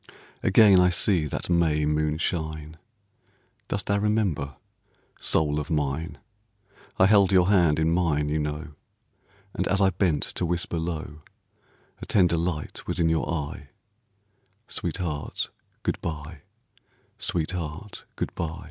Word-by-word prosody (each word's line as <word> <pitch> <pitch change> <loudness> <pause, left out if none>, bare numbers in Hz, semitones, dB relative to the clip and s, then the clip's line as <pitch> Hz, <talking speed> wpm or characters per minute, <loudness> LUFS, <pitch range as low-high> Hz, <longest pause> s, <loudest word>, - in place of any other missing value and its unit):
Again 100 -1 +6
I 90 0 +5
see 90 -3 +2
that - - -4
May 80 -4 +2
moon 75 0 0
shine, 80 -2 -3 0.9
Dost - - -2
thou 100 0 +1
remember, 100 - 0 0.6
soul 75 -1 +2
of 75 - -5
mine? 75 +2 -2 0.8
I 95 - +6
held 100 -1 +5
your 90 -1 +4
hand 85 -7 +4
in 80 +1 +2
mine, 80 -4 +1
you 75 +1 0
know, 75 +1 -3 0.8
And 95 - -1
as 95 +1 +1
I 95 -1 +4
bent 90 -5 +1
to - - -2
whisper 85 0 -1
low, 80 -2 -5 0.8
A - - -7
tender 90 -4 +3
light 80 -3 -3
was - - -2
in 80 -1 +3
your 80 0 0
eye, 75 -4 -4 1.0
"Sweetheart, 75 -5 -3 0.3
good - - -1
by, 80 -1 -6 0.8
sweetheart, 85 +3 -3
good - - -3
by." 85 +1 -4
80 Hz, 130 wpm, -26 LUFS, 75-90 Hz, 1.0 s, Again